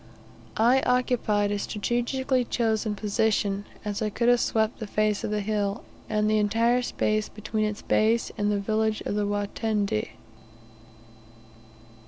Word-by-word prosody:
I 245 +4 +4
occupied 240 -5 +1
a 205 - -1
strategically 245 +5 -1
chosen 220 -3 0
position, 205 -1 0 0.2
as 205 0 -3
I 215 - 0
could 235 +3 +1
have 245 0 +5
swept 220 -1 0
the 220 - -5
face 215 0 0
of - - -2
the 210 0 -1
hill, 205 -1 -1 0.3
and 210 0 +1
the 215 0 +3
entire 230 +4 +2
space 215 -3 -1
between 215 0 -2
its 210 0 -4
base 225 +2 +2
and 205 -1 0
the 205 - +1
village 215 +1 0
of - - -3
Watende. 205 - -1
215 Hz, 140 wpm, -26 LUFS, 205-230 Hz, 0.3 s, have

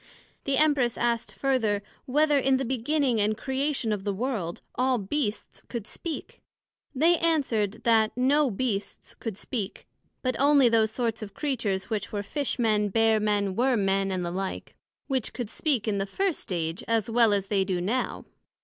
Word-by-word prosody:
The 275 -1 +1
Empress 280 -6 +3
asked 235 -3 -1
further, 220 -4 +1 0.2
Whether 295 +2 +3
in 265 0 +3
the 265 - -2
beginning 260 -1 +1
and 210 +1 +1
Creation 265 -2 -1
of 205 -2 -2
the 200 -1 -1
World, 210 -7 -3
all 255 0 +2
Beasts 215 +1 -3
could 235 -4 -4
speak? 320 +7 -6 0.5
They 330 +5 +4
answered, 255 -11 0
That 220 -2 +4
no 275 +3 +3
Beasts 210 -2 -3
could 220 -5 -6
speak, 215 -5 -5 0.4
but 255 -1 0
onely 280 -2 +5
those 225 -1 +3
sorts 230 0 -2
of 210 -2 -8
Creatures 230 -9 -2
which 210 -3 -2
were 205 -1 -2
Fish 285 +6 -2
men, 215 -3 +2
Bear 225 +1 +3
men, 205 -2 0
Worm 245 -3 +2
men, 195 0 +1
and 180 -2 -1
the 170 - -3
like, 190 +1 -4 0.3
which 260 -4 -1
could 235 -4 -5
speak 260 -7 0
in 205 -2 0
the 195 - -1
first 380 - -2
Age, 165 -1 -2
as 225 -3 +1
well 230 -1 +4
as 200 -2 +1
they 195 -1 +1
do 185 -2 -1
now. 220 +9 -2
230 Hz, 175 wpm, -27 LUFS, 205-265 Hz, 0.5 s, onely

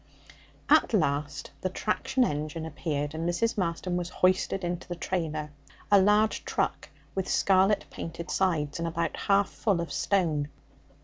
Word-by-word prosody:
At - - +5
last 145 -4 -1
the 185 - 0
traction 215 +6 0
engine 155 -3 -2
appeared, 150 -2 -3
and 165 +2 -2
Mrs. 230 +7 0
Marston 175 -1 -1
was 175 -1 -3
hoisted 185 +1 +1
into 175 0 -3
the 175 - -4
trailer 155 -4 -3 0.4
a 200 -1 +7
large 210 +2 +3
truck - - -2 0.2
with 190 -1 -2
scarlet 195 +2 +3
painted 165 +1 -6
sides, 165 -6 0
and 170 - -1
about 165 0 -1
half 200 0 +2
full 200 -6 0
of 170 -3 -3
stone. 160 -7 +1
175 Hz, 145 wpm, -28 LUFS, 155-190 Hz, 0.4 s, a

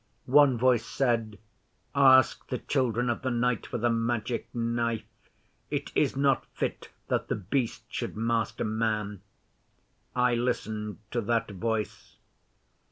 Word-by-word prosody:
One 135 -1 +5
voice 120 -1 +3
said, 115 -5 0 0.6
"Ask 130 -2 +5
the 125 - -2
Children 125 -2 0
of 120 - -1
the 130 - -1
Night 125 -1 0
for - - -3
the 120 +1 +1
Magic 115 +1 -1
Knife. 115 -1 -1 0.6
It - - -3
is - - +2
not 135 -1 +2
fit - - -3 0.2
that - - 0
The - - 0
Beast 115 +4 -2
should - - -4
master 115 -1 0
man." 105 -2 -1 0.9
I 125 0 +3
listened 110 -3 -2
to 120 - 0
that 115 0 0
voice. 110 +2 -3
115 Hz, 130 wpm, -28 LUFS, 110-125 Hz, 0.9 s, One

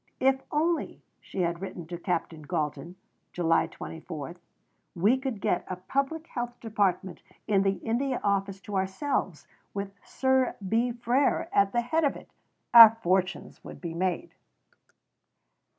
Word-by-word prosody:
"If 265 0 +3
only," 325 +2 -1 0.2
she 190 - -5
had 170 0 -1
written 185 -3 -6
to 175 +2 -6
Captain 170 -3 -2
Galton 150 +3 -3 0.4
(July 165 -2 +2
24), 160 -1 -8 0.6
"we 200 +8 +4
could 260 -6 -4
get 180 -1 0
a 185 - -3
Public 275 - -2
Health 240 -5 -5
Department 200 -5 -1 0.3
in 200 -3 +3
the 195 0 +2
India 250 +3 -1
Office 195 -1 0
to 205 - -7
ourselves 190 +10 -2 0.3
with 200 0 -4
Sir 260 -1 +1
B. 230 +5 +1
Frere 240 +3 +1
at 200 0 +4
the 240 - +1
head 320 +7 0
of 285 - +2
it, - - -13 0.4
our 225 -1 +11
fortunes 185 +1 -1
would - - -10
be 170 -2 -5
made." 185 - -2
200 Hz, 140 wpm, -28 LUFS, 180-250 Hz, 0.6 s, our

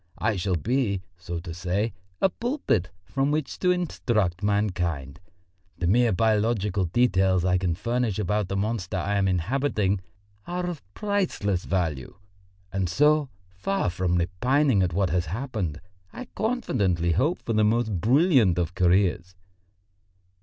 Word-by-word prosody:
I 110 0 0
shall 95 0 0
be, 100 - 0
so 85 -1 -6
to 85 -1 -7
say, 95 +6 -1 0.3
a - - +6
pulpit 235 - -1
from 135 +10 -1
which 150 -2 -2
to 180 - +2
instruct 115 - 0
mankind. 90 -9 -1 0.6
The 90 - -2
mere 115 +6 +4
biological 105 -2 +1
details 95 -2 +2
I 90 0 +2
can 90 -3 0
furnish 115 +1 -1
about 105 0 0
the 95 - -2
monster 100 -2 -2
I 100 +3 -1
am 100 -1 +2
inhabiting 100 - 0 0.5
are 180 0 -2
of 175 -4 -4
priceless 180 - -1
value. 80 -9 -2 0.6
And 95 -2 0
so, 150 - +3 0.2
far 95 - -2
from 90 0 0
repining 110 - +2
at 90 -2 +1
what 95 +1 0
has 85 -1 0
happened, 100 - -3 0.3
I 255 - -7
confidently 100 - 0
hope 150 - +1
for 115 - -2
the 110 0 +3
most 110 -4 +1
brilliant 125 - +4
of 85 -1 -1
careers." 90 0 +2
100 Hz, 140 wpm, -26 LUFS, 90-125 Hz, 0.6 s, a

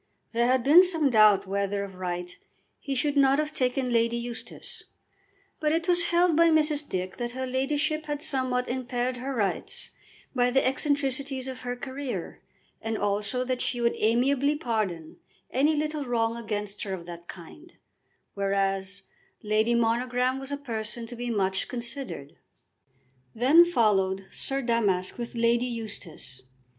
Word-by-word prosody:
There 235 +1 +2
had 255 -1 +2
been 305 +6 +8
some 325 -7 +4
doubt 210 -3 +5
whether 200 +1 -1
of 195 -1 -8
right 180 -1 -5 0.4
he 275 - -4
should 290 +3 0
not 275 -1 +4
have 305 0 -1
taken 250 -1 0
Lady 230 0 +2
Eustace, 235 0 -8 0.8
but 305 -1 +1
it 330 +2 0
was 350 -1 +4
held 345 -1 +3
by 335 +1 +5
Mrs. 305 -2 +2
Dick 185 0 -3
that 240 0 -4
her 260 +1 -3
ladyship 290 +4 0
had 295 0 -3
somewhat 255 -4 0
impaired 250 0 -2
her 260 +3 -4
rights 205 -4 -2 0.4
by 250 -1 +2
the 265 +2 +2
eccentricities 270 -1 -1
of 260 -1 -6
her 245 0 -3
career, 265 0 -6 0.4
and 225 -1 -2
also 205 +4 0
that 255 -1 -2
she 245 - -1
would 235 0 +2
amiably 265 +6 +2
pardon 215 - -3 0.3
any 295 +4 +2
little 300 0 -2
wrong 230 -3 0
against 210 -3 -4
her 195 -2 -2
of 170 -2 -10
that 170 0 -10
kind, 250 - -12 0.6
whereas 195 -1 -1 0.4
Lady 215 +2 +2
Monogram 245 +3 +1
was 270 +1 -6
a 285 - -2
person 230 -4 -4
to 240 +1 -7
be 240 +1 -4
much 190 -4 0
considered. 235 - -5 1.0
Then 275 +9 +7
followed 195 - +1
Sir 270 0 0
Damask 210 -5 0
with 235 0 -5
Lady 235 +1 +2
Eustace. 205 - -6
245 Hz, 150 wpm, -27 LUFS, 210-275 Hz, 1.0 s, been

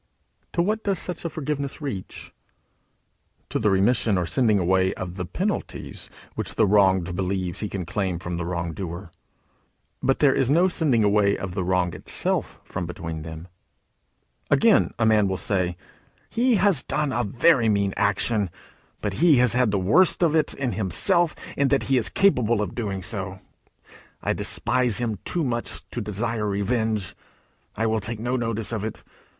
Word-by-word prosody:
To 170 - +2
what 215 +4 -1
does 200 -2 0
such 180 +2 -4
a - - 0
forgiveness 145 -2 -4
reach? 130 -11 -6 1.2
To - - -1
the 110 - +2
remission 100 +1 +2
or 90 - 0
sending 110 +1 +2
away 95 +1 +2
of 90 -1 -6
the 90 -2 -4
penalties 200 - -4 0.2
which - - -4
the - - +4
wronged 95 -3 +3
believes 95 -2 -2
he 105 - -3
can 95 -3 -4
claim 95 0 -2
from 85 0 -5
the 85 - -3
wrong 85 -1 -3
doer. 85 0 -6 0.9
But 135 - +2
there 140 -3 +4
is 130 - +1
no 170 +6 +4
sending 150 -11 +1
away 100 -1 +3
of 95 -2 -5
the 95 -1 -2
wrong 90 -1 0
itself - - -1
from 90 -2 -5
between 80 -2 -6
them. 80 +2 -8 1.0
Again, - - +4
a 115 - +1
man 110 -2 +4
will 95 0 -2
say: 90 -4 -1 0.5
"He 240 +1 +2
has 195 -6 +4
done 145 - -1
a 125 - 0
very 120 +2 +3
mean 100 -2 +1
action, 100 0 +1 0.5
but 105 -2 -1
he 170 -3 +6
has 125 -2 +4
the 120 -5 +2
worst 150 - +3
of 160 -3 +3
it 155 - +2
himself 135 - +2 0.2
in 140 - +2
that 135 0 +2
he 135 - +2
is 110 - 0
capable 120 - +2
of - - -5
doing 100 -5 -3
so. 95 -1 -4 0.9
I - - +1
despise 125 -2 +1
him 110 -5 -2
too 175 - 0
much 120 -3 -3
to 120 - -3
desire 105 +1 -2
revenge. 105 -1 -1 0.6
I 115 - -1
will 110 0 +1
take 110 +2 -5
no 120 +3 -1
notice 115 -3 -1
of 110 -3 -3
it. 110 - -6
110 Hz, 170 wpm, -24 LUFS, 95-130 Hz, 1.2 s, he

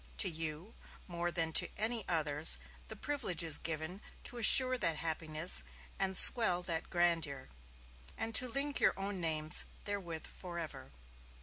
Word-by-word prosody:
To - - +1
you, 160 +5 -6 0.3
more 175 0 -7
than 165 -1 -4
to - - +2
any 225 +2 -4
others, 155 -2 +2 0.3
the - - -11
privilege 240 - -4
is 160 -3 +4
given 160 +4 -7 0.2
to 245 - -8
assure 255 +3 +7
that 165 - 0
happiness 160 +1 -1 0.4
and 190 -1 -2
swell 185 -7 +6
that 165 -2 -6
grandeur, 165 -6 -4 0.7
and 225 0 -8
to 255 +3 +5
link 280 +3 -4
your - - -1
own 195 -1 -8
names 155 -2 +3 0.2
therewith 180 -6 -8
forever." 170 - -11
170 Hz, 140 wpm, -30 LUFS, 160-205 Hz, 0.7 s, assure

